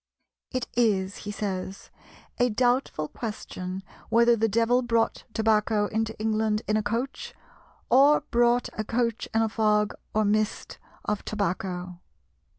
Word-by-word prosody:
"It 255 -2 -2
is," 200 -5 +1
he - - -2
says, 195 -2 -5 0.5
"a 245 0 +4
doubtful 245 - +1
question 190 -3 -6 0.3
whether 235 +1 +5
the 225 0 +1
devil 230 +4 +3
brought 230 -2 0
tobacco 220 -1 +2
into 220 +1 -2
England 215 0 0
in 215 - +1
a 215 - +2
coach, 230 +6 -3 0.5
or 285 +4 +6
brought 240 0 +3
a 215 - -3
coach 230 +1 -1
in 225 0 +2
a - - +2
fog 210 -1 +2 0.2
or 215 0 +3
mist 215 +1 -1 0.3
of 210 -1 -1
tobacco." 180 -3 -3
220 Hz, 135 wpm, -26 LUFS, 205-235 Hz, 0.5 s, or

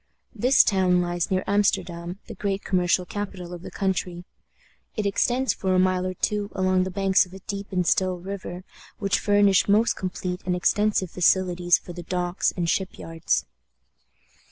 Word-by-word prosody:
This 250 +5 +4
town 185 -3 +2
lies 175 -1 -1
near 185 0 0
Amsterdam, 180 -3 0
the 225 - -8
great 200 -1 -3
commercial 180 -1 +1
capital 185 -3 -6
of 175 - -8
the - - -8
country. 180 -2 -2 0.7
It 215 - -2
extends 245 +6 +1
for 190 -1 -1
a - - +4
mile 185 0 +2
or 185 - -4
two 205 +2 -1
along 185 -1 +2
the - - -3
banks 190 0 +2
of 180 - -17
a - - -9
deep 200 +1 -6
and 180 -2 0
still 185 +1 +1
river, 185 -1 -7 0.3
which 200 -2 0
furnish 205 -2 +3
most 215 +3 +3
complete 180 -1 -4
and 180 0 -1
extensive 195 0 +1
facilities 180 -1 +3
for 175 - -10
the 175 - -7
docks 175 +1 -1
and 175 -1 -1
ship 190 +3 -1
yards. 165 0 -1
185 Hz, 170 wpm, -24 LUFS, 180-200 Hz, 0.7 s, This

